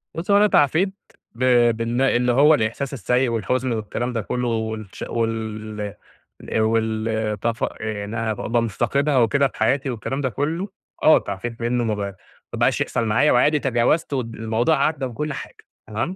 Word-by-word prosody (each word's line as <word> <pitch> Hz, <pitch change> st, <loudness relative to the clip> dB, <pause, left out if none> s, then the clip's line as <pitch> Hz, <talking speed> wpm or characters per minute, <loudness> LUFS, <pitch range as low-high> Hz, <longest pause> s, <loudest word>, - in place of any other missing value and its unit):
بُص 170 Hz, +5 st, -3 dB
هو 200 Hz, -, +6 dB
أنا 210 Hz, +1 st, +5 dB
تعافيت، 175 Hz, +3 st, +3 dB, 0.4 s
ب 125 Hz, -, -3 dB, 0.3 s
بإن 115 Hz, +2 st, -1 dB
إن 125 Hz, -2 st, +2 dB
هو 140 Hz, +6 st, +6 dB
الإحساس 130 Hz, +1 st, -1 dB
السيء 125 Hz, +2 st, +1 dB
والحزن 120 Hz, +3 st, -1 dB
والكلام 115 Hz, +2 st, -3 dB
ده 115 Hz, -, -1 dB
كله 125 Hz, +4 st, -2 dB
والش 110 Hz, -3 st, -4 dB
وال 110 Hz, -2 st, -3 dB, 0.5 s
الأ 110 Hz, -, -1 dB
وال 110 Hz, -1 st, 0 dB
تفا 115 Hz, +1 st, -1 dB
آآ 110 Hz, -2 st, -3 dB
إنّها 110 Hz, +1 st, -2 dB
ابقي 105 Hz, -, -5 dB
مُفتقدها 140 Hz, +6 st, 0 dB
وكده 140 Hz, +4 st, +3 dB
في 125 Hz, -, -15 dB
حياتي 135 Hz, +5 st, +1 dB
والكلام 130 Hz, +3 st, -3 dB
ده 130 Hz, -, 0 dB
كله، 160 Hz, -, -2 dB, 0.3 s
آه 155 Hz, -, +7 dB
تعافيت 115 Hz, +4 st, -6 dB
منّه. 120 Hz, +1 st, 0 dB
ما 110 Hz, -2 st, 0 dB
بقا 100 Hz, -1 st, -3 dB, 0.5 s
ما -, -, -4 dB
بقاش -, -, +2 dB
يحصل 115 Hz, -, -1 dB
معايا 115 Hz, +7 st, +3 dB
وعادي 150 Hz, +5 st, +4 dB
تجاوزت 135 Hz, +5 st, +1 dB
ود 115 Hz, -4 st, -3 dB
والموضوع 115 Hz, +7 st, +1 dB
عدَّى 150 Hz, -4 st, -2 dB
وكل 145 Hz, +5 st, -4 dB
حاجة. -, -, -8 dB, 0.3 s
تمام؟ 115 Hz, -, -3 dB
120 Hz, 170 wpm, -22 LUFS, 110-140 Hz, 0.5 s, آه